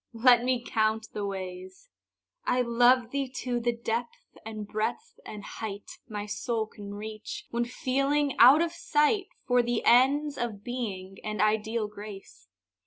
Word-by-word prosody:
Let 240 +1 +5
me 250 -1 0
count 220 0 0
the 205 -1 -3
ways. 185 - -7 0.5
I 250 0 +2
love 240 0 +4
thee 275 -2 -1
to 245 -2 -1
the 240 0 +1
depth 235 0 -4
and 215 -2 -6
breadth 240 - -3
and 210 -1 -8
height 205 -2 -7
My 205 -1 -4
soul 220 +1 -2
can 205 -2 -9
reach, 220 - -7
when 235 0 0
feeling 275 +2 0
out 270 +7 +8
of 340 - -2
sight 340 +4 +1 0.2
For 245 -1 +4
the 240 -1 -1
ends 280 +4 +4
of 220 -4 -3
Being 200 -6 -5
and 215 -1 -4
ideal 215 +1 +1
Grace. 205 - -11
235 Hz, 150 wpm, -28 LUFS, 210-255 Hz, 0.5 s, out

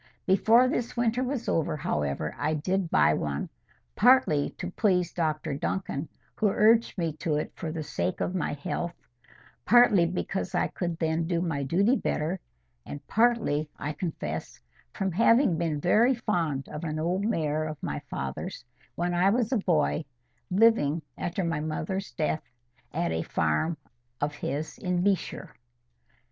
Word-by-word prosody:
Before 225 +6 +5
this 245 -1 -2
winter 240 +1 +1
was 255 -2 -3
over, 155 -1 0
however, 75 - -2
I 155 +1 0
did 180 +4 -1
buy 75 - +4
one, 70 -2 -2 0.5
partly 215 - +4
to 180 - -5
please 180 -4 +1
Dr 155 -2 -1
Duncan, 150 0 -3 0.2
who 215 - +1
urged 225 +3 +3
me 165 -3 -1
to 155 -2 -1
it 150 - -3
for 160 - -4
the 160 -1 -4
sake 90 -11 -2
of 180 - -1
my 180 -5 -1
health, 170 +4 -3 0.7
partly 215 -7 +6
because 185 +1 -3
I - - +1
could 175 -2 -3
then 160 0 0
do 170 -1 0
my 165 -5 -1
duty 195 - +3
better, 165 - -1 0.4
and 145 - -8
partly, 220 -10 +2
I 150 +1 -3
confess, 165 +2 -5 0.3
from 195 -2 -2
having 230 - +4
been 160 -3 -1
very 230 - +4
fond 165 - -1
of 150 - -7
an 155 -2 -3
old 175 +5 0
mare 155 -8 0
of 155 -1 -5
my - - -2
father's, 65 - -5 0.3
when 175 +1 -1
I 180 +2 +4
was 235 +2 +1
a 255 - +3
boy, 160 -4 +1 0.4
living, 180 -7 +3
after 175 +2 -2
my 165 -3 -1
mother's 160 +5 -3
death, 155 -1 -1 0.5
at - - -1
a 80 0 -1
farm 80 - 0 0.4
of 145 0 -1
his 155 +2 -4
in 180 -1 0
B—shire. 200 -1 -1
170 Hz, 155 wpm, -28 LUFS, 150-195 Hz, 0.7 s, partly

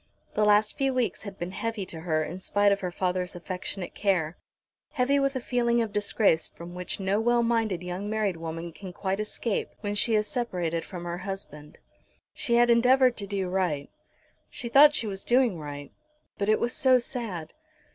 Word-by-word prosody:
The 210 - +1
last 210 +4 +3
few 270 -1 +1
weeks 250 -3 0
had 200 -2 -8
been 175 +1 -4
heavy 225 0 -3
to 165 -3 -8
her 160 -1 0
in 175 +4 -6
spite 205 +2 +2
of 200 - +2
her 185 - -3
father's 180 0 -2
affectionate 180 +1 -5
care, 180 -5 0 0.6
heavy 280 0 +2
with 275 0 +1
a - - 0
feeling 240 -1 +1
of 225 -3 -1
disgrace 205 -5 +2
from 170 +1 -11
which 180 +2 -5
no 195 +2 +1
well 240 +1 +3
minded 225 -6 0
young 180 +3 -4
married 210 -5 0
woman 165 +1 -5
can 185 +1 -9
quite 190 +2 -2
escape, 215 0 -2
when 205 -1 -2
she 220 +2 +2
is 210 0 +2
separated 175 -10 -2
from 180 -3 -8
her 175 0 -4
husband. 180 -6 -5 0.6
She 235 -4 0
had 240 0 +5
endeavoured 250 +1 +5
to 200 - -5
do 195 -2 -2
right. 180 -6 -1 0.6
She 235 - -6
thought 295 +4 +7
she 230 - 0
was 195 -2 -4
doing 240 -7 +3
right. 145 -1 -7 0.5
But 200 +1 0
it 215 - +4
was 240 +1 0
so 260 -1 +5
sad! 225 - -4
200 Hz, 190 wpm, -27 LUFS, 180-235 Hz, 0.6 s, thought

